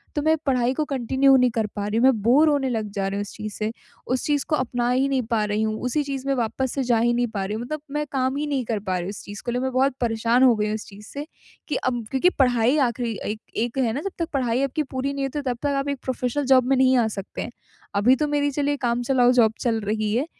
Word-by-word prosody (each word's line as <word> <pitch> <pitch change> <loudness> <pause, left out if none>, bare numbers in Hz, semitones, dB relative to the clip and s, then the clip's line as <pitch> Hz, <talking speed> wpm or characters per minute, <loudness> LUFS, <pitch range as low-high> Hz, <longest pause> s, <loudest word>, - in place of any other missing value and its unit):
तो 295 - 0
मैं 315 +2 +3
पढ़ाई 255 -2 +2
को 305 +2 -1
कंटिन्यू 270 0 +3
नहीं 250 -1 +4
कर 220 -2 -1
पा 205 0 -2
रही 215 +2 -1
हूँ, 235 - +2
मैं 260 -5 +4
बोर 290 +7 +5
होने 280 -3 +1
लग 220 -3 -2
जा 195 -1 -2
रही 195 +1 -3
हूँ - - -1
इस 205 - -7
चीज़ 215 -1 -6
से, 215 +1 -2 0.4
उस 255 0 -1
चीज़ 290 -2 +1
को 305 - +3
अपना 245 -2 -1
ही 260 +2 +2
नहीं 265 -1 +1
पा 220 -2 +2
रही 210 +1 -1
हूँ, 215 0 -1
उसी 295 +4 0
चीज़ 275 -1 -5
में 275 - +2
वापस 245 +2 -1
से 275 - 0
जा 240 -2 +2
ही 240 +1 +2
नहीं 240 0 +1
पा 195 - -1
रही 210 +2 -3
हूँ 225 - -4
मतलब 300 +4 -5
मैं 300 0 -1
काम 265 0 0
ही 300 0 -2
नहीं 270 -4 -1
कर 220 -2 -1
पा 190 -2 -2
रही 175 - -2
हूँ, 185 - -4
इस 200 - -8
चीज़ 205 0 -9
को 240 - -1
लिए 245 +1 -1
मैं 260 - -1
बहुत 265 +1 +2
परेशान 235 +2 +2
हो 245 -3 +6
गई 210 - 0
हूँ 215 - -1
इस 215 - -6
चीज़ 205 +1 -13
से 285 +1 -6 0.4
कि 300 - -2
अब 245 -3 -1
क्योंकि 270 +7 +3
पढ़ाई 250 +1 +3
आखिरी 235 -3 -3
एक 215 - -6 0.2
एक 240 +3 -2
है 235 -4 +1
ना, 280 - -3
जब 395 +3 -4
तक 335 0 -1
पढ़ाई 255 -1 +1
आपकी 275 +3 -1
पूरी 270 0 -3
नहीं 275 -1 -2
होती 270 +2 -3
है, 285 - -5
तब - - -13
तक 285 -1 +1
आप 275 - -2
एक 280 -2 -3
प्रोफ़ेशनल 260 +2 -2
जॉब 260 -1 +5
में 270 - +3
नहीं 260 0 +4
आ 230 - +3
सकते 200 -2 -6
हैं। - - -5 0.4
अभी 225 +6 +5
तो 300 +2 -1
मेरी 290 -1 +1
चलिए 285 +1 0
काम 235 +1 +1
चलाऊ 250 -1 +4
जॉब 225 -3 +4
चल 230 -2 +1
रही 210 +1 -1
है, 255 +5 +1
250 Hz, 295 wpm, -23 LUFS, 225-275 Hz, 0.4 s, हो